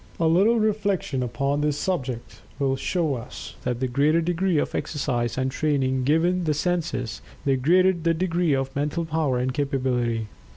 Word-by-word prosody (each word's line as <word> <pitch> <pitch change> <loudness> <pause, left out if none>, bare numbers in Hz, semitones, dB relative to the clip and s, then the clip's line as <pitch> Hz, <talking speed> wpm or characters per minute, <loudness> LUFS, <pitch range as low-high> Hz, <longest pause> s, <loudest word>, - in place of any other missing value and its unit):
A 165 - +2
little 195 +8 +4
reflection 205 -10 0
upon 140 +4 -1
this 150 -1 0
subject 130 -10 -3 0.2
will 135 -2 +1
show 160 +2 0
us 125 -1 -7
that 125 -1 -2
the 130 - 0
greater 145 +6 +3
degree 175 +1 +1
of - - 0
exercise 120 -6 -2
and 130 0 0
training 130 -3 0
given 170 +5 +2
the 155 -2 +1
senses, 155 -8 -2 0.2
the 135 -1 +3
greater 180 +8 +4
the 165 -1 0
degree 175 -2 +1
of 135 0 -3
mental 150 +4 -1
power 155 -5 0
and 125 +1 -1
capability. 125 -5 0
145 Hz, 165 wpm, -25 LUFS, 130-170 Hz, 0.2 s, little